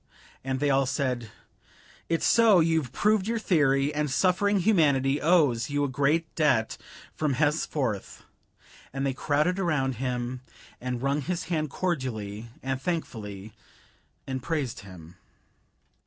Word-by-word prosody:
And 130 0 -2
they 145 0 +2
all 135 -1 +2
said: 130 -4 -2 0.8
"It's 165 -1 +1
so 225 -5 +6
you've 160 -6 +1
proved 210 +6 +2
your 230 +1 0
theory, 145 -8 +2
and 150 0 -1
suffering 190 +7 +2
humanity 145 -8 +3
owes 145 -9 +3
you 145 0 0
a - - +1
great 150 +5 0
debt 130 -8 +2 0.4
from 150 -3 0
henceforth," 145 - -1 0.7
and 135 +1 -3
they 135 - 0
crowded 150 +7 0
around 135 - 0
him, 125 0 -3 0.4
and 125 0 -3
wrung 140 +2 +1
his 175 +5 -3
hand 155 -2 0
cordially 120 - -3
and 135 0 -2
thankfully, 110 - -4 0.7
and 130 -1 -4
praised 145 -4 -2
him. 90 -4 -13
140 Hz, 130 wpm, -27 LUFS, 125-160 Hz, 0.8 s, so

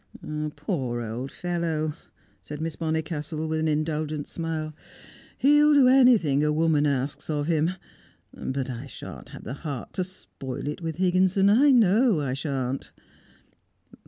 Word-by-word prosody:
"Poor 140 -6 -2
old 120 +3 -4
fellow!" 165 -3 -2 0.5
said 150 0 -8
Miss 160 0 -3
Bonnicastle, 160 -1 -3
with 160 0 -1
an 160 - 0
indulgent 155 -1 -1
smile, 160 -2 -4 0.6
"he'll 295 +2 +5
do 270 -3 +6
anything 235 - +5
a 150 - +2
woman 155 -1 +2
asks 140 +1 -2
of 145 -2 0
him. 165 +2 +1 0.6
But 135 0 -3
I 125 +1 -6
shan't - - -10
have - - -10
the 120 - -5
heart 145 -7 -5
to 185 - -1
spoil 145 -8 -7
it 150 +4 -4
with 165 -2 -3
Higginson; 185 +2 +3
I 270 +7 +5
know 225 - +4
I 135 -3 -1
shan't." 135 -1 -3
155 Hz, 140 wpm, -26 LUFS, 145-180 Hz, 0.6 s, do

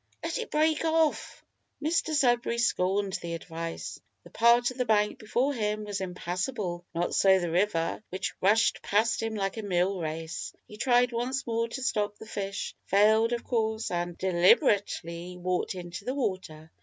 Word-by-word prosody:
let - - -2
it 465 - -5
break 310 +1 +2
off!" 320 -1 0 0.3
Mr 315 +1 0
Sudberry 240 -4 +2
scorned 195 -3 +1
the 170 0 -4
advice. 165 0 -6 0.2
The - - -15
part 235 +2 +4
of 250 - -12
the - - +3
bank 210 -2 +2
before 245 +6 0
him 215 -3 -1
was 205 -2 -4
impassable; 180 +1 -3
not 170 - -1
so 190 -1 +5
the 175 -3 -2
river, 170 -1 0
which 190 +2 -3
rushed 215 +4 +3
past 220 +3 +1
him 225 -1 -2
like 195 0 -2
a - - -2
mill 190 -1 0
race. 160 -1 -4
He 210 - -12
tried 245 +1 +3
once 250 +3 -2
more 230 0 0
to 255 +3 -6
stop 210 -5 -1
the - - -11
fish; 200 -2 -4
failed, 220 +3 +4
of 235 -1 -2
course, 220 -2 -1
and 175 0 -2
deliberately 180 - +2
walked 180 +1 -1
into 175 +1 -7
the 255 +5 -3
water. 175 - -4
210 Hz, 170 wpm, -28 LUFS, 180-235 Hz, 0.3 s, so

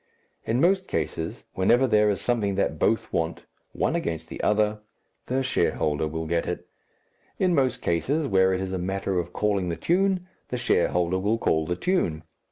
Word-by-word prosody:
In 115 +2 0
most 190 +4 +3
cases, 80 0 -3
whenever 120 +8 +3
there 105 -3 +4
is 100 - 0
something 110 -5 0
that 100 - 0
both 110 - +1
want, 80 0 -2 0.3
one - - 0
against 80 0 -3
the - - -6
other, 105 0 +2 0.5
the 130 +1 0
shareholder 75 - 0
will 80 +1 -4
get 85 +1 -1
it; 90 0 -4 0.7
in 185 -2 +2
most 130 -5 +1
cases, 140 - 0
where 95 -3 +4
it 95 0 0
is 95 0 -3
a 95 - -1
matter 95 0 -1
of 85 0 -4
calling 100 -2 0
the 85 - -1
tune, 185 - +1 0.2
the 125 - -3
shareholder 90 -6 +1
will 105 +4 +1
call 80 -7 +1
the 90 - 0
tune. 90 - 0
100 Hz, 175 wpm, -26 LUFS, 85-125 Hz, 0.7 s, there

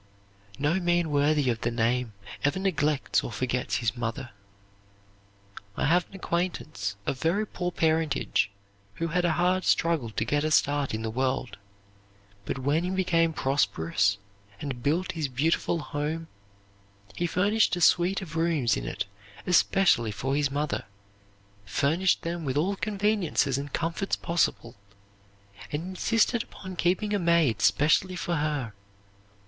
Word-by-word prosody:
'" 100 0 -32
No 150 +6 +1
man 175 -2 +1
worthy 145 0 +2
of 115 - -4
the 120 - 0
name 120 0 0 0.3
ever 145 +5 +1
neglects 155 -7 +1
or - - -5
forgets 125 +2 -1
his 115 -1 0
mother. 120 +1 -4 1.5
I - - +1
have 170 +4 +2
an - - -14
acquaintance, 170 - -2
of 130 - -2
very 190 +7 +1
poor 180 -3 -3
parentage, 160 - +1 0.5
who 165 +6 -2
had 175 +2 +1
a 170 - +2
hard 180 +2 +1
struggle 165 -10 +1
to 110 0 -2
get 145 +3 +1
a 155 - +1
start 145 -4 +2
in 110 - -4
the 110 - -2
world; 130 +1 -1 0.9
but - - -3
when 145 +5 +1
he 180 - -1
became 175 -3 +2
prosperous 100 - +1 0.4
and 135 -4 -5
built 165 +8 0
his 160 -3 -2
beautiful 155 +6 0
home, 155 +1 -3 0.9
he 175 - -1
finished 200 +4 +2
a 175 - -4
suite 180 +4 +3
of 165 -3 -9
rooms 160 -8 +2
in - - -4
it 95 - -3 0.4
especially 180 - +3
for 120 +7 -2
his 145 -1 +1
mother, 145 -4 -2 0.8
furnished 140 - +1
them 170 0 -3
with 135 -1 -2
all 185 +7 +1
conveniences 200 - 0
and 140 +1 -4
comforts 170 +6 -1
possible, 165 -8 -1 1.0
and 150 +2 -2
insisted 225 +5 +1
upon 185 -5 -9
keeping 185 +5 0
a 205 - +2
maid 165 - +2
specially 150 - +3
for 175 -1 -2
her. 145 -7 -2
155 Hz, 145 wpm, -27 LUFS, 130-175 Hz, 1.5 s, suite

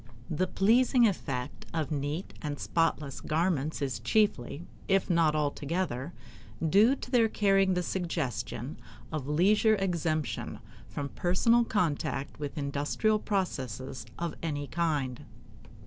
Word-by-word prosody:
The 185 +4 +1
pleasing 235 +6 +4
effect 125 -10 -4
of 160 -3 -1
neat 145 +5 -3
and 150 -2 -3
spotless 155 -4 0
garments 155 -2 0
is 130 -6 -2
chiefly, 150 - +1 0.2
if 195 -1 +2
not 165 -3 +3
altogether, 150 -1 -1 0.6
due 210 - +5
to 250 - -9
their 230 -3 +4
carrying 195 -3 +3
the 180 - 0
suggestion 145 - -3 0.3
of 150 -4 -3
leisure 205 +8 +4
exemption 170 -6 -1 0.3
from 140 -1 -4
personal 230 - +3
contact 150 - -1
with 145 +1 -5
industrial 145 +10 +1
processes 135 - -3
of 170 -1 -2
any 145 -3 -2
kind. 145 -6 -1
165 Hz, 115 wpm, -30 LUFS, 145-195 Hz, 0.6 s, due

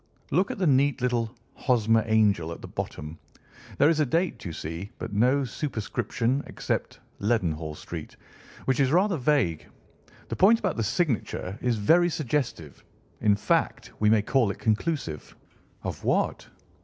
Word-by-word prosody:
Look 185 +7 +2
at - - -4
the 190 - 0
neat 140 -1 +3
little 120 -3 0 0.2
'Hosmer 115 -3 +2
Angel' 105 -7 +2
at 85 - -7
the - - -6
bottom. 75 +2 -6 0.6
There 145 - +5
is 160 -1 +3
a 150 - +4
date, 170 +7 0
you 85 - -4
see, 80 +5 -6
but 115 -2 -6
no 125 +7 +3
superscription 120 0 -2
except - - -3 0.2
Leadenhall 85 -8 0
Street, - - -8 0.5
which 130 -2 +1
is 135 -1 +3
rather 185 +2 +3
vague. 125 - +1 0.6
The - - -2
point 210 +5 +6
about 190 -7 -1
the 115 - -1
signature 115 - -1
is 125 -2 +1
very 170 +12 +4
suggestive—in 115 - -2
fact, 105 +1 0
we 105 - +4
may 110 -1 +4
call 125 -1 +2
it 100 - -4
conclusive." 110 - -2 0.5
"Of - - -5
what?" - - 0
120 Hz, 150 wpm, -27 LUFS, 105-145 Hz, 0.6 s, point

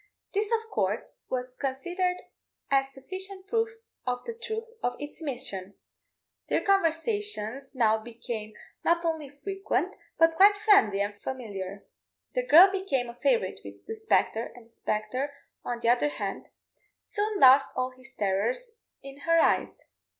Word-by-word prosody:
This, 415 +1 0
of 450 -1 +1
course, 205 +2 -1
was 255 0 -3
considered 355 +8 -1 0.5
as 270 0 +3
sufficient 375 +8 -7
proof 450 +2 +1 0.3
of 245 -1 -2
the 465 - -5
truth 455 -1 -5 0.2
of 245 - -1
its 290 +3 -8
mission. 245 -10 -5 0.7
Their - - +2
conversations 330 - 0
now 220 -3 +3
became 225 -1 -6 0.3
not 340 0 +2
only 320 -4 -1
frequent, 385 +8 -2 0.2
but 330 0 +5
quite 405 +2 +7
friendly 395 - +5
and 205 0 -3
familiar. 200 -6 -5 0.5
The - - -1
girl 365 +3 +9
became 285 -11 -1
a - - -7
favourite - - +2
with - - -11
the 445 - -5
spectre, 435 - +1
and 245 -2 -14
the - - -21
spectre, 255 +6 -2 0.3
on 240 -1 -3
the 235 - +2
other 250 +5 +3
hand, - - -4 0.5
soon 420 0 -2
lost 270 0 +8
all 255 0 -1
his 255 0 -14
terrors 215 - 0 0.3
in 275 0 -9
her 330 0 +5
eyes. - - +2
275 Hz, 145 wpm, -28 LUFS, 240-390 Hz, 0.7 s, girl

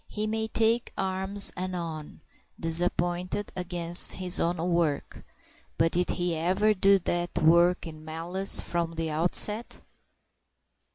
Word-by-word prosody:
He 210 0 -5
may 220 0 -3
take 225 +1 +1
arms 190 +1 0
anon, 170 -4 -7 0.4
disappointed, 175 +3 +1
against 175 -1 +3
his 180 -1 -2
own 175 +1 -1
work; 165 -3 -3 0.5
but 165 0 +1
did 180 +1 -1
he 175 -2 -2
ever 185 +6 0
do 195 0 +3
that 175 -1 -4
work 170 +3 +2
in 155 -2 -11
malice 170 +5 0
from 170 -1 -4
the 165 -1 -4
outset? 180 +8 +3
175 Hz, 120 wpm, -26 LUFS, 165-190 Hz, 0.5 s, against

